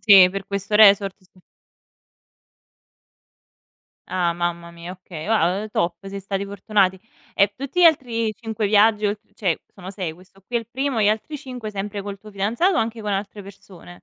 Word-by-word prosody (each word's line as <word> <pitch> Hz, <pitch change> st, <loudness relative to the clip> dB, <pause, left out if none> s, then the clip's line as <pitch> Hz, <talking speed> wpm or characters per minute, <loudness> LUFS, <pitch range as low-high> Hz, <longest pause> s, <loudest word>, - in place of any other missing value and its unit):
Sì, 195 Hz, -4 st, +8 dB
per 195 Hz, 0 st, -5 dB
questo 200 Hz, +1 st, -3 dB
resort, 200 Hz, -2 st, +6 dB
sì. 185 Hz, 0 st, -25 dB, 2.7 s
Ah 175 Hz, -2 st, 0 dB
mamma 170 Hz, 0 st, -3 dB
mia, 170 Hz, +1 st, -8 dB
okay. 180 Hz, -4 st, -9 dB
Ah, 195 Hz, -3 st, +2 dB
uhm, 215 Hz, -, -6 dB
top, 170 Hz, -4 st, 0 dB
siete 195 Hz, 0 st, -7 dB
stati 195 Hz, 0 st, -3 dB
fortunati. 200 Hz, -2 st, 0 dB, 0.3 s
E 200 Hz, 0 st, +3 dB
tutti 275 Hz, +6 st, -3 dB
gli -, -, +7 dB
altri 240 Hz, -9 st, +3 dB
5 225 Hz, -2 st, -3 dB
viaggi 210 Hz, +1 st, +4 dB
oltr 210 Hz, +1 st, -5 dB
cioè 185 Hz, -6 st, -1 dB
sono 190 Hz, -1 st, -9 dB
6, 185 Hz, -5 st, -4 dB
questo 185 Hz, +3 st, -20 dB
qui 240 Hz, -, -3 dB
è -, -, +4 dB
il 230 Hz, -, -9 dB
primo, 260 Hz, 0 st, -1 dB
gli 205 Hz, -, +4 dB
altri 220 Hz, +8 st, -2 dB
5 250 Hz, -5 st, -7 dB
sempre 205 Hz, 0 st, -5 dB
col 200 Hz, 0 st, -7 dB
tuo 215 Hz, +2 st, -13 dB
fidanzato 220 Hz, -, +1 dB
o -, -, +3 dB
anche 225 Hz, 0 st, -2 dB
con 210 Hz, -1 st, -2 dB
altre 200 Hz, +1 st, -4 dB
persone? 185 Hz, -2 st, -14 dB
200 Hz, 180 wpm, -22 LUFS, 190-220 Hz, 2.7 s, Sì